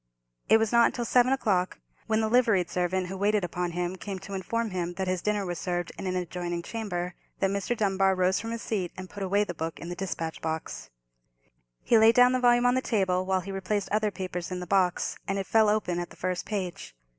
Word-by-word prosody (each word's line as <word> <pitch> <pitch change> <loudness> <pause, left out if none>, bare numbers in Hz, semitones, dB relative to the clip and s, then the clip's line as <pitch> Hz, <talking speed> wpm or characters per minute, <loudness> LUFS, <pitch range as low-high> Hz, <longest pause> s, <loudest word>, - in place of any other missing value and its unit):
It - - +8
was 225 -1 0
not 235 0 +4
till 240 - -2
seven 250 +2 +4
o'clock, 195 -9 +1 0.3
when 220 0 +2
the 220 - +1
liveried 220 -6 +3
servant 180 +1 0
who 185 +2 -6
waited 205 +1 +1
upon 175 0 -2
him 175 +1 -2
came 195 0 -5
to 195 +1 -9
inform 220 +4 -2
him 175 -1 -3
that 190 0 -2
his 185 -1 0
dinner 210 0 0
was 175 -2 -4
served 175 -1 -2
in 195 - -5
an 185 - -1
adjoining 175 -1 -3
chamber, 180 -5 -4 0.3
that 195 - +2
Mr. 200 +4 -1
Dunbar 195 -2 +2
rose 185 +1 +2
from 225 - -5
his 230 0 -4
seat 190 -6 -2
and 185 -1 -8
put 205 - -8
away 200 +2 +2
the 180 - -5
book 165 0 -4
in 170 - -7
the 175 - -4
despatch 165 -3 -4
box. 160 - -4 0.9
He 230 - +5
laid 225 +1 +6
down 250 0 +7
the 255 - +1
volume 240 0 +4
on 245 - +5
the 260 - +1
table 185 -6 0
while 190 -1 +1
he 195 +2 -7
replaced 195 +1 -2
other 215 0 +2
papers 180 -2 -5
in 180 -1 -4
the 180 - -5
box, 180 -1 +1
and 195 - -1
it 195 - -2
fell 220 +1 +4
open 195 -5 0
at 175 - -4
the - - -14
first 180 -2 -3
page. 185 - -4
190 Hz, 235 wpm, -28 LUFS, 180-215 Hz, 0.9 s, It